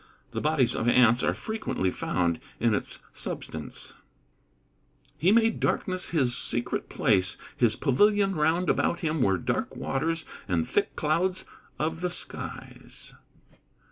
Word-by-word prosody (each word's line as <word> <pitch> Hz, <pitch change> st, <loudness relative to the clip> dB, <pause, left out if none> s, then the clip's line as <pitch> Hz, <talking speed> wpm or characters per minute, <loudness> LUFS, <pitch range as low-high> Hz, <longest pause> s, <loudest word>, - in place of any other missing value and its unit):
The -, -, -3 dB
bodies 150 Hz, -5 st, +2 dB
of 115 Hz, -, -1 dB
ants 120 Hz, -1 st, +5 dB
are -, -, +2 dB
frequently 220 Hz, -, -2 dB
found 85 Hz, -3 st, -1 dB, 0.2 s
in 115 Hz, -1 st, +2 dB
its -, -, -2 dB, 0.2 s
substance. -, -, -6 dB
[Verse: -, -, -18 dB, 1.2 s
"He 175 Hz, +6 st, +4 dB
made 225 Hz, 0 st, +3 dB
darkness 185 Hz, -1 st, -1 dB
his 130 Hz, -7 st, +1 dB
secret 120 Hz, +1 st, 0 dB
place: 100 Hz, -7 st, +2 dB, 0.2 s
his 120 Hz, -3 st, +3 dB
pavilion 200 Hz, +8 st, +3 dB
round 165 Hz, +3 st, +1 dB
about 170 Hz, -, +1 dB
him 160 Hz, -2 st, 0 dB
were 95 Hz, -4 st, +3 dB
dark -, -, -2 dB
waters 165 Hz, +4 st, -2 dB, 0.2 s
and 85 Hz, -4 st, 0 dB
thick -, -, 0 dB
clouds 180 Hz, +5 st, 0 dB, 0.3 s
of 160 Hz, +2 st, -2 dB
the 180 Hz, -, 0 dB
skies." 175 Hz, -, -7 dB
150 Hz, 135 wpm, -27 LUFS, 120-180 Hz, 1.2 s, ants